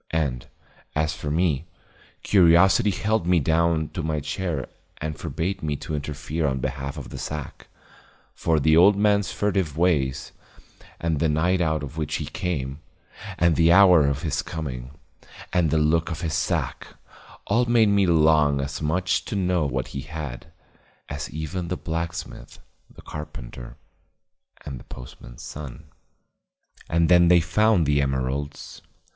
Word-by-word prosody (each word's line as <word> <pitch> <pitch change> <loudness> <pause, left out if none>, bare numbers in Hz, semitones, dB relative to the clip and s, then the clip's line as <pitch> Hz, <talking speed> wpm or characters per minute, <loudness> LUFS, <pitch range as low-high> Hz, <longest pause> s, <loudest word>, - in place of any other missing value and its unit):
And, 70 -7 -2 0.5
as 75 0 +1
for 75 - -5
me, 80 -1 0 0.6
curiosity 95 +2 +5
held 105 -1 0
me 90 -1 +4
down 80 0 +1
to 90 - -5
my 80 -1 -1
chair 80 -1 -3 0.3
and 75 0 -4
forbade 90 +5 -3
me 75 -2 -1
to 75 - -7
interfere 75 +2 -3
on 65 -1 -1
behalf 70 +2 -4
of 70 - -7
the - - -8
sack; 75 -3 -6 0.7
for 80 -2 +1
the 80 +2 +4
old 95 +5 +7
man's 100 -2 +2
furtive 95 -7 -1
ways, 75 -7 +1 0.7
and 80 -3 -1
the 80 +1 +2
night 90 +4 +1
out 80 -3 0
of 70 +2 -8
which 75 -1 -2
he - - -3
came, 70 -6 -3 0.6
and 85 -1 +3
the 85 0 +4
hour 90 -5 +7
of 70 0 -1
his 80 - -1
coming, 65 -6 -6 0.6
and 90 -3 +2
the 80 - +1
look 80 +2 +2
of 85 +1 -5
his 80 -3 -2
sack, 85 -4 -1 0.6
all 120 +4 +2
made 115 -3 +4
me 100 -2 +3
long 75 -3 +4
as 70 +2 -4
much 90 +4 0
to - - -4
know 90 -5 +1
what 65 -2 -3
he 70 - -5
had, 75 -3 -7 0.6
as 70 -2 -5
even 80 +3 -4
the 90 - -3
blacksmith, 85 +1 -5 0.3
the - - -16
carpenter 60 -5 -8 0.9
and 70 -4 -6
the - - -13
postman's - - -11
son. 70 -1 -8 1.1
And 85 0 +2
then 85 0 +6
they 90 0 +6
found 90 +2 +2
the 70 0 +2
emeralds. 70 +1 -3
80 Hz, 150 wpm, -24 LUFS, 70-90 Hz, 1.1 s, old